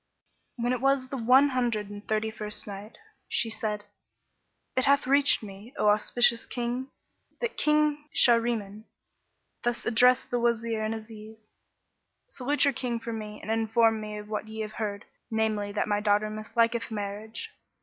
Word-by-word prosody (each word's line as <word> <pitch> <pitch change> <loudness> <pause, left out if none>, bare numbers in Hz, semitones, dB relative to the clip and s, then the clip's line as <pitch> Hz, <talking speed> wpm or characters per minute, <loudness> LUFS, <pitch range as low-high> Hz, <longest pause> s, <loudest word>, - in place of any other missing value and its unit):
When 240 +1 0
it 250 - -3
was 270 -1 +2
the 270 - -4
One 260 +4 +5
Hundred 235 -6 -1
and 205 0 -9
Thirty 220 0 0
first 210 -1 -3
Night, 205 +2 -9 0.3
She 225 - 0
said, 210 -1 -3 0.9
It 260 - +3
hath 280 0 +3
reached 275 -2 +5
me, 205 +4 -11
O 210 - +3
auspicious 230 +2 +3
King, 245 +1 -3 0.5
that 475 -2 -3
King 300 0 +1
Shahriman 230 -3 +2 0.8
thus 240 0 -2
addressed 250 +3 +4
the 245 - +1
Wazir 230 -2 0
and 215 +1 -1
Aziz, 220 0 -11 0.8
"Salute 285 - +1
your 280 - +3
King 245 -2 -3
from 230 -1 -5
me 210 -1 -8
and 220 - -3
inform 225 0 +2
him 210 0 -6
of 210 - -10
what 215 0 -4
ye 220 0 -6
have 215 0 -5
heard, 205 -1 -3 0.2
namely 220 -2 -1
that 205 - -1
my 205 -1 +1
daughter 210 0 +1
misliketh 230 +2 0
marriage." 210 +1 -6
225 Hz, 160 wpm, -27 LUFS, 215-245 Hz, 0.9 s, One